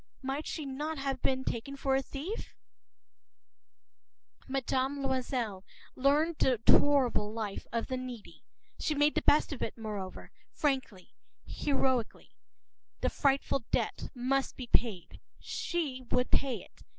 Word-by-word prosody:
Might 270 +3 -2
she 310 - -3
not 295 +4 -3
have 270 -1 -2
been 260 0 +1
taken 265 +3 -3
for 270 -1 +1
a 270 - +3
thief? 300 - -6 1.9
<INT>Mme. 270 +1 0
Loisel 250 -7 -1 0.3
learned 300 +5 +3
the 255 -4 +3
horrible 260 -7 +5
life 215 -3 -4
of 230 - 0
the 260 - -2
needy. 250 -4 -8 0.4
She 305 - 0
made 295 +1 +4
the - - +1
best 300 +1 +4
of 270 - -7
it, - - -3
moreover, 210 -4 -6 0.2
frankly, 260 - -1 0.3
heroically. 265 -5 0 0.7
The - - +1
frightful 275 -2 +2
debt - - -1
must 265 +2 0
be 255 - -5
paid. 220 -7 0 0.2
She 300 -7 -2
would 250 0 +1
pay 270 -3 +1
it. - - -20
265 Hz, 130 wpm, -31 LUFS, 240-280 Hz, 1.9 s, horrible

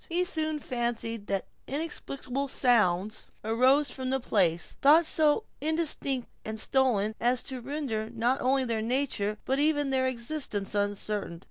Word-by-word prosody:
He 345 +2 +1
soon 315 -4 -1
fancied 235 -5 -3
that 195 -1 -1 0.2
inexplicable 275 -2 -3
sounds 215 -6 +2 0.2
arose 255 +6 +3
from 260 -1 -4
the 265 0 +1
place, 175 -8 +1
though 305 +4 +7
so 315 +4 +2 0.2
indistinct 300 -5 +1 0.2
and 220 0 -4
stolen, 220 -4 +2
as 245 +2 +1
to 260 -2 -6
render 245 -5 -3
not 240 +3 0
only 265 +1 +2
their 230 -2 -1
nature 225 -4 -1
but 265 +1 +1
even 290 -2 +2
their 260 -1 +2
existence 235 -5 -2
uncertain. 205 -3 -2
255 Hz, 140 wpm, -28 LUFS, 220-280 Hz, 0.2 s, though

